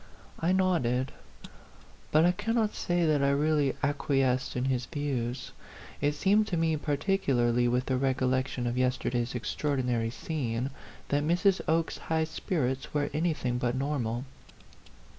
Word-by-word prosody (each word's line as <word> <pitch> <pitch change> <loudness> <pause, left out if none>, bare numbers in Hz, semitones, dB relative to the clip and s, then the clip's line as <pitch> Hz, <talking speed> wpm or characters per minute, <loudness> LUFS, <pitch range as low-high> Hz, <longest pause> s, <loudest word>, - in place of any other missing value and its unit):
I 170 +2 +1
nodded. 155 -10 +1 1.0
But 155 +2 +5
I 175 - +5
cannot 215 +3 0
say 175 -1 0
that 150 -3 +3
I 140 - +3
really 145 0 +2
acquiesced 135 -3 +1
in 125 +1 0
his 130 -2 0
views. 130 -5 -3 0.5
It 145 +1 +2
seemed 205 +6 +3
to 175 - -1
me, 165 -1 +2
particularly 140 -6 +1
with 125 +1 +1
the 130 - 0
recollection 130 -1 0
of 120 +1 -1
yester 125 -1 0
day's 120 0 -1
extraordinary 125 -2 -1
scene, 125 -2 -3 0.4
that 145 0 +2
Mrs. 180 +4 +2
Oke's 165 +1 +1
high 160 0 0
spirits 150 -5 -2
were 145 -1 0
anything 150 -7 0
but 120 0 0
normal. 130 -3 -2
140 Hz, 140 wpm, -29 LUFS, 125-160 Hz, 1.0 s, But